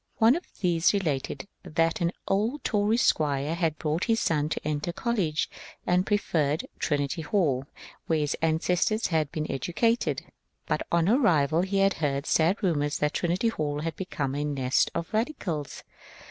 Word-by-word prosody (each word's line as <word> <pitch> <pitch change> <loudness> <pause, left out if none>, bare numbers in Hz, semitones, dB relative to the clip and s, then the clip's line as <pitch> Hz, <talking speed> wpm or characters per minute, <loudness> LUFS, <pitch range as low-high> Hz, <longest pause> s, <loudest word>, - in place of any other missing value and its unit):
One 230 +3 +5
of 345 - -5
these 175 +1 +3
related 155 -4 -2
that 165 +2 0
an 170 0 +2 0.2
old 220 +9 0
Tory 210 +1 +2
squire 150 - +1
had 165 -3 0
brought 155 +4 -1
his 225 -1 +2
son 150 -6 +1
to 155 - -3
enter 150 +2 -1
college, 180 -7 -1 0.4
and 180 +1 +2
preferred 160 -8 +1
Trinity 145 +2 -1
Hall, 145 -7 +1 0.4
where 160 - +2
his 150 -1 0
ancestors 180 +7 +1
had 155 -4 0
been 155 -1 -2
educated. 225 - 0 0.4
But - - -1
on 170 0 +3
arrival 170 - +3
her 190 +2 -1
had 195 0 +4
heard 140 -2 -1
sad 165 +6 +3
rumotirs 145 -5 +1
that 150 0 0
Trinity 180 +6 +1
Hall 150 -7 -2
had 165 -1 -3
become 145 -8 -3
a 145 +1 -1
nest 135 -3 +1
of 170 - -4
radicals. 205 - -2
165 Hz, 160 wpm, -27 LUFS, 150-195 Hz, 0.4 s, One